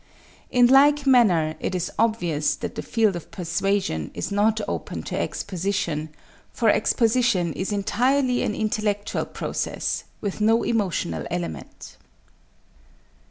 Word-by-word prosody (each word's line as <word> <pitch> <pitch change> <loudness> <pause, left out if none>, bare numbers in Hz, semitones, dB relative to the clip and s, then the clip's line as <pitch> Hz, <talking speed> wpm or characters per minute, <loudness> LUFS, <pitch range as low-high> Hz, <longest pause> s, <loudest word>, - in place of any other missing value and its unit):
In 245 -1 +5
like 285 +3 +5
manner, 190 - +4
it 185 - -3
is 180 -1 -2
obvious 175 -10 +1
that - - -6
the - - -4
field 220 -5 +1
of 170 - -8
persuasion 180 - -1
is - - -4
not 210 +2 +2
open - - -4
to - - -5
exposition, 180 -5 -2 0.4
for 230 - +1
exposition 225 -7 +2
is 190 +3 -3
entirely 250 +5 +1
an 210 - -1
intellectual 210 -1 -1
process, - - -3 0.2
with 205 0 -4
no 225 +2 +3
emotional 180 - -1
element. 80 -5 -6
205 Hz, 120 wpm, -24 LUFS, 175-230 Hz, 0.4 s, In